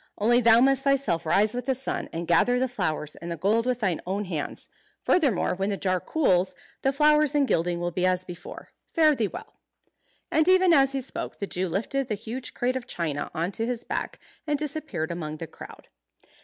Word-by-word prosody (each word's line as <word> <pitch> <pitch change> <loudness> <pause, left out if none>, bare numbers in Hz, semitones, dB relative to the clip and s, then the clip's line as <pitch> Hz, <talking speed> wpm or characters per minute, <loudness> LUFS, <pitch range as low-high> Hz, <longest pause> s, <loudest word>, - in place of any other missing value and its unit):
Only 240 +4 +3
thou 230 0 +6
must 270 0 +3
thyself 260 - +1
rise 210 +6 +3
with 245 +2 -5
the 265 - +2
sun, 265 - -4
and 170 +1 -4
gather 245 +8 +3
the 260 +1 +1
flowers 160 - -2
and 170 - -7
the 170 - -4
gold 220 +8 +1
with 250 -1 0
thine 185 -6 0
own 200 +2 -2
hands. 160 -6 -4 0.4
Furthermore, 275 - +2
when 195 +2 -2
the 200 - -1
jar 185 -1 0
cools, 185 - +1 0.3
the 270 - +2
flowers 300 +1 +3
and 285 -2 +3
gilding 170 -2 0
will 175 0 -2
be 180 +2 -2
as 185 0 +1
before. 175 0 -10 0.2
Fare 310 -2 +4
thee 225 -5 0
well." - - -10 0.7
And 315 +1 +3
even 370 -1 +5
as 275 -3 +4
he 270 - -1
spoke 255 - -6
the 200 - -3
Jew 185 -1 -2
lifted 235 +9 -1
the 215 - -1
huge 230 +5 -6
crate 250 +1 0
of 255 -2 -4
china 155 -4 -3
on 170 +3 -1
to 225 +3 -2
his 245 -1 -3
back, - - -4 0.3
and 295 -1 +1
disappeared 295 - -3
among 155 -3 -5
the 165 - -5
crowd. - - -13
220 Hz, 210 wpm, -26 LUFS, 175-270 Hz, 0.7 s, thou